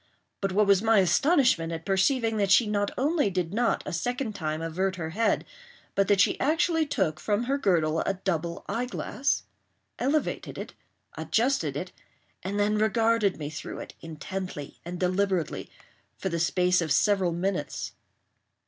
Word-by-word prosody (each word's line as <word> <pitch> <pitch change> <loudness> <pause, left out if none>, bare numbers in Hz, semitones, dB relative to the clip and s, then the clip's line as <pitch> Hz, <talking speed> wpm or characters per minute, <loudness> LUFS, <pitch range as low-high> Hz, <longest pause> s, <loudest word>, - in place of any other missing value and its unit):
But 195 -1 0
what 210 +3 +3
was 200 -1 +4
my 225 0 +4
astonishment 195 - +3
at 165 -1 -5
perceiving 225 +4 +2
that 200 -2 +1
she 225 +5 +6
not 205 -1 0
only 290 -3 +2
did 180 -2 -2
not 235 +2 +1
a - - -4
second 245 +6 -2
time 155 -5 -3
avert 185 +4 -1
her 160 -2 -4
head, 225 +6 +1 0.5
but 195 -1 +2
that 200 -2 +3
she - - +3
actually 320 +1 +2
took 155 - 0
from 210 +2 0
her 275 +3 0
girdle 165 - +2
a 195 - 0
double 170 -3 -3
eyeglass—elevated 260 +3 -3
it—adjusted 220 - -2
it—and 185 +3 -8
then 210 +1 +2
regarded 220 -1 +2
me 150 -1 -5
through 155 - -6
it, - - -8
intently 165 -1 -6
and 175 +1 -6
deliberately, 185 -2 0 0.5
for 190 - -2
the 170 -1 -2
space 180 +1 +2
of 160 -3 -2
several 190 +3 +3
minutes. 175 -2 -2
195 Hz, 150 wpm, -27 LUFS, 170-225 Hz, 0.5 s, she